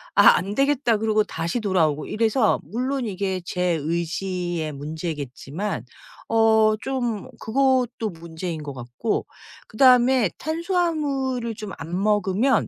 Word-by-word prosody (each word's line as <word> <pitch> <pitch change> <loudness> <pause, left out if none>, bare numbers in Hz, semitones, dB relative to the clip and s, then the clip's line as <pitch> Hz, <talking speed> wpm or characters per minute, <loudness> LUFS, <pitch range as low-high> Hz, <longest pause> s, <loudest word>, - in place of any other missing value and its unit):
'아 - - +7
안 200 +3 -3
되겠다.' 275 -4 +2
그러고 215 0 +2
다시 170 +3 -3
돌아오고 165 -8 +1
이래서 225 +1 +2
물론 255 +3 -2
이게 190 -2 -2
제 180 - -3 0.2
의지의 170 +1 -2
문제겠지만 150 +3 -5 0.4
어 220 -1 +4
좀 245 -5 -2
그것도 250 -2 +1
문제인 165 -2 -6
것 140 - -6
같고 125 - -3 0.4
그다음에 250 -1 +5
탄수화물을 305 - -1
좀 210 -2 -7
안 170 +5 -4
먹으면 210 +5 +2
215 Hz, 260 characters per minute, -23 LUFS, 170-250 Hz, 0.4 s, 아